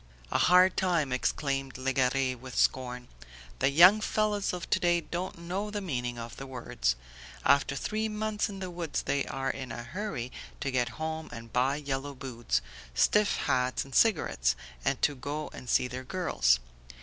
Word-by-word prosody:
"A - - +2
hard 180 +1 +6
time!" 170 -7 +1
exclaimed 135 0 -1
Legare 130 0 +1
with 125 0 -9
scorn. 125 -1 +1 0.5
"The - - +3
young 180 +9 +7
fellows 210 -2 +1
of 180 -1 -5
to - - +4
day 175 -1 +3
don't 175 +3 -4
know 185 +5 -3
the 210 0 -3
meaning 125 -10 -3
of 115 -1 -7
the 135 - -7
words. 115 - -1 0.5
After 140 0 +4
three 215 +8 -1
months 215 0 -1
in 200 - -7
the 185 -1 -5
woods 170 -4 -3
they 140 - 0
are 135 0 -1
in 130 -3 -7
a 120 - -5
hurry 135 - -4 0.3
to 140 - -2
get 125 -2 +1
home 160 0 -4
and 115 -1 -9
buy 130 +3 +2
yellow 140 -1 -3
boots, 120 - -2 0.3
stiff 210 - +4
hats 130 +1 +1
and 135 - -13
cigarettes, 95 - +3 0.3
and - - +1
to 145 - +4
go 145 +3 -5
and 125 - -9
see 125 - +3
their 125 +1 -6
girls. 130 - +2
140 Hz, 175 wpm, -29 LUFS, 125-180 Hz, 0.5 s, young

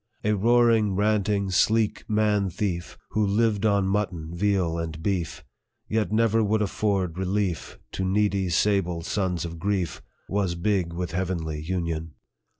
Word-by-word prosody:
A 105 - +2
roaring, 115 -1 +3
ranting, 100 -1 +1
sleek 110 +3 +2
man 105 -2 +2
thief, 90 -2 -3
Who 110 - +1
lived 105 +1 +2
on 100 -2 +2
mutton, 95 -5 -2
veal, 90 -3 +1
and 80 -1 -4
beef, 85 -4 -2 0.4
Yet 110 -2 0
never 115 0 +3
would 105 +1 +2
afford 95 -4 -1
relief 95 -3 -2
To 95 - -3
needy, 100 -1 +1
sable 90 -1 +1
sons 90 -2 -1
of 85 -1 -7
grief, 95 -1 -1 0.3
Was 95 -3 0
big 90 -1 0
with 90 0 -4
heavenly 85 -4 -2
union. 80 -2 -3
95 Hz, 140 wpm, -25 LUFS, 85-105 Hz, 0.4 s, roaring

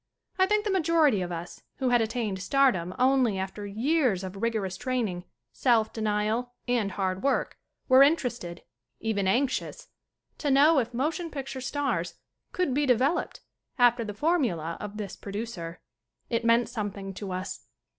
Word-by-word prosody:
I 375 - +5
think 420 +1 +1
the 415 - 0
majority 320 - +3
of 180 -1 -3
us, 170 0 -7
who 260 -2 0
had 240 -1 +4
attained 220 -4 -2
stardom 195 -7 +2
only 255 -5 +3
after 195 +2 -4
years 235 - +1
of 190 0 -6
rigorous 220 -5 -1
training, 215 -7 -2 0.3
self 225 - +2
denial 220 +3 -1
and 230 -6 0
hard 185 -1 -1
work, 275 - 0 0.3
were 260 0 +7
interested, 245 - +1 0.4
even 205 -4 -1
anxious, 255 +7 -1 0.5
to 295 - -1
know 285 +3 +6
if 240 -2 -2
motion 315 +7 -2
picture 270 -3 -6
stars 245 - -2 0.4
could 360 -8 0
be 290 +1 +1
developed 265 +7 +1 0.4
after 240 -1 +4
the 210 -2 -6
formula 220 - 0
of 210 0 -7
this 205 -3 -5
pro 200 - -9
ducer. 195 -6 -5 0.5
It 230 0 0
meant 230 +1 +4
something 200 -3 -5
to 195 0 -6
us. 185 +1 -5
230 Hz, 155 wpm, -27 LUFS, 195-270 Hz, 0.5 s, were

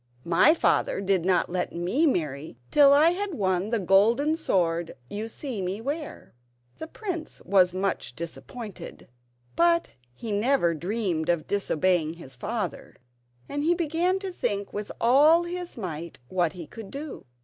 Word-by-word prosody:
My 175 - +5
father - - +1
did 195 -3 +1
not 180 -2 +2
let 180 0 -3
me 185 - +1
marry 150 - -2
till 285 -1 +7
I 300 +4 +6
had 385 0 -3
won 190 -1 0
the 230 - +1
golden 225 - +3
sword 170 - 0 0.2
you 215 +2 -4
see 240 -3 -5
me 185 +3 -3
wear." 290 +6 -5 0.5
The 320 - -6
prince 345 -3 -6
was 185 -1 +4
much 185 -8 -2
disappointed, 200 - -8 0.5
but 340 0 +3 0.2
he 225 - -6
never 205 -4 +2
dreamed 175 -1 -2
of 170 -3 +1
disobeying 180 -4 +1
his 150 -6 -11
father, 210 - -4 0.5
and 290 0 -3
he 340 +3 +3
began 345 +3 +1
to 385 -2 -4
think 200 - -2
with 205 0 -4
all 295 +8 +5
his 350 -2 -6
might 170 -5 -6
what 175 -3 0
he 175 -3 -8
could 220 +4 -10
do. 280 - -8
205 Hz, 150 wpm, -26 LUFS, 175-295 Hz, 0.5 s, till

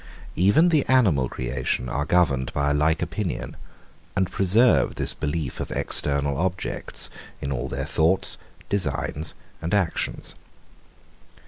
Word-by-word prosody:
Even 100 - +5
the 155 -5 +3
animal 95 - +3
creation 65 0 -2
are 70 +4 -1
governed 75 -7 +2
by 70 0 +1
a - - +2
like 80 +3 +2
opinion, 85 +3 -4 0.6
and 95 -2 +1
preserve 110 +6 +4
this - - 0
belief 75 -3 -3
of - - -4
external 70 -1 0
objects, 95 +1 -3 0.3
in 70 - -4
all - - -2
their - - -3
thoughts, 85 +4 +1 0.3
designs, 80 -4 -2 0.3
and 85 +4 0
actions. 95 -5 -1
80 Hz, 125 wpm, -24 LUFS, 70-95 Hz, 0.6 s, Even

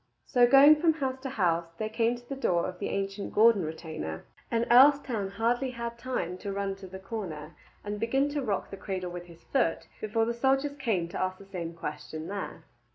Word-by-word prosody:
So 245 -3 +4
going 280 +4 +8
from 330 -2 +4
house 265 -4 -3
to 265 - -4
house 170 -8 0
they 215 - -2
came 230 +2 +1
to 240 0 -14
the 275 - -4
door 175 -10 +1
of 180 -1 -7
the - - -2
ancient 195 +1 -3
Gordon 220 -1 +6
retainer, 155 - -6 0.2
and 230 0 +1
Earlstoun 255 -5 +5
had 230 +4 +1
hardly 255 -1 -3 0.2
time 185 -9 -3
to 200 - -4
run 195 0 -2
to 195 - -10
the 190 +1 -8
corner 185 -6 -6 0.3
and 205 0 -4
begin 265 +6 +1
to 290 0 -2
rock 210 -7 -2
the 195 - -6
cradle 185 -3 -4
with 175 0 -7
his 170 -1 -16
foot 245 -12 0
before 220 +1 0
the 235 - -1
soldiers 270 +4 +1
came 210 -10 0
to - - -4
ask 185 0 -1
the 200 - -14
same 170 -4 -6
question 155 +1 -6
there. 200 -1 -5
205 Hz, 210 wpm, -29 LUFS, 180-250 Hz, 0.3 s, going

